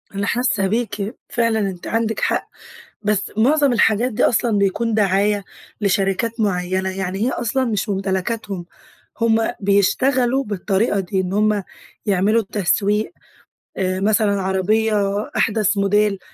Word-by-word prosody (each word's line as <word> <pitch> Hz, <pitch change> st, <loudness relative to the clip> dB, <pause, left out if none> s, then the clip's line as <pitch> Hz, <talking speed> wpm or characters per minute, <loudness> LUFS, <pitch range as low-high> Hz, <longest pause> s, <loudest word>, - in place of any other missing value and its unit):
أنا 200 Hz, 0 st, -1 dB
حاسة 235 Hz, -5 st, +1 dB
بيكِ، 215 Hz, 0 st, -2 dB
فعلًا 230 Hz, -2 st, +1 dB
آنتِ 190 Hz, -4 st, -3 dB
عندِك 225 Hz, -1 st, -1 dB
حق، -, -, 0 dB, 0.6 s
بس 205 Hz, -1 st, -1 dB
معظم 280 Hz, +4 st, +3 dB
الحاجات 235 Hz, +1 st, +2 dB
دي 235 Hz, -, +1 dB
أصلًا 230 Hz, -3 st, +2 dB
بيكون 215 Hz, +4 st, 0 dB
دعاية 205 Hz, 0 st, +2 dB, 0.4 s
لشركات 200 Hz, +3 st, 0 dB
معينة، 190 Hz, -1 st, 0 dB
يعني 190 Hz, 0 st, -4 dB
هي 240 Hz, +5 st, +1 dB
أصلًا 245 Hz, +3 st, -1 dB
مش 215 Hz, -2 st, -1 dB
ممتلكاتهم. 195 Hz, -1 st, -2 dB, 0.5 s
هم 225 Hz, -1 st, +3 dB, 0.2 s
بيشتغلوا 245 Hz, +7 st, +2 dB
بالطريقة 205 Hz, +1 st, 0 dB
دي، 190 Hz, +1 st, -2 dB
إن 185 Hz, 0 st, -3 dB
هم 210 Hz, 0 st, +2 dB, 0.4 s
يعملوا 205 Hz, +3 st, +3 dB
التسويق 205 Hz, -, 0 dB, 0.7 s
آآ، 185 Hz, 0 st, -1 dB
مثلًا 205 Hz, -1 st, +2 dB
عربية 210 Hz, +4 st, +1 dB, 0.4 s
أحدث 215 Hz, -2 st, +1 dB
موديل 200 Hz, 0 st, +2 dB
205 Hz, 125 wpm, -20 LUFS, 195-225 Hz, 0.7 s, معظم